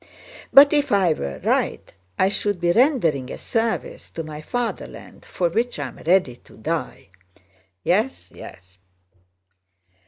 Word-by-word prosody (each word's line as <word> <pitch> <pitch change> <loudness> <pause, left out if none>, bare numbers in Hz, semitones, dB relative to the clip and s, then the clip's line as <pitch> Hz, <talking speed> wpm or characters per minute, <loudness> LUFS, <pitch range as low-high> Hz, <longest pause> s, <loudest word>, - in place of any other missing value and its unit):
"But 280 +2 +8
if 290 -1 +1
I 190 -5 +4
were 70 - -5
right, - - -1 0.2
I 190 - +3
should 205 -1 -1
be 175 0 +2
rendering 175 - +2
a - - -6
service 225 0 -2
to 165 - -6
my 155 -1 -8
Fatherland 245 +8 -5
for 175 - -1
which 235 +8 -1
I 145 -3 -4
am - - -15
ready 170 -8 +1
to - - -20
die." 155 -4 -4 0.7
"Yes, 215 +9 0
yes." 95 +1 -13
180 Hz, 135 wpm, -22 LUFS, 150-230 Hz, 0.7 s, But